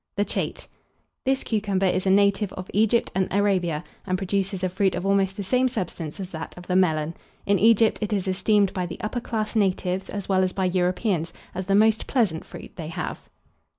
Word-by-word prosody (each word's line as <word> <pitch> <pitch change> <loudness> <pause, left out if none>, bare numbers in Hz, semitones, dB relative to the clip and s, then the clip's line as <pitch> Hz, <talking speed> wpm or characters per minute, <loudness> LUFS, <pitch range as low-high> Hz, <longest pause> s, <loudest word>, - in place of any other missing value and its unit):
THE 205 - +1
CHATE. - - -3 0.6
This 265 0 +1
cucumber 200 -3 0
is 185 +1 +1
a - - +4
native 200 0 +3
of 185 0 -8
Egypt 220 +3 +2
and 190 0 +1
Arabia, 185 -6 +1 0.2
and 185 -1 +1
produces 195 0 -1
a 185 - +2
fruit 190 +1 +1
of 180 +1 -3
almost 195 -1 +2
the 200 - -3
same 250 +6 +2
substance 185 -8 -4
as 190 -1 -6
that 160 +1 -7
of 180 - -10
the 180 - -1
Melon. 160 -4 +2 0.3
In 200 -1 +3
Egypt 225 0 +4
it 210 - -2
is 195 -2 0
esteemed 200 +1 +2
by 180 -2 -2
the 170 - -8
upper 215 +4 -2
class 220 -1 -3
natives, 190 -2 0
as 200 -2 -5
well 190 -1 +3
as 185 - 0
by 190 - 0
Europeans, 180 -1 0 0.2
as 185 0 -4
the 195 - +3
most 220 +1 +3
pleasant 210 - +1
fruit - - -11
they 160 -3 -5
have. 165 - -5
190 Hz, 205 wpm, -25 LUFS, 180-210 Hz, 0.6 s, a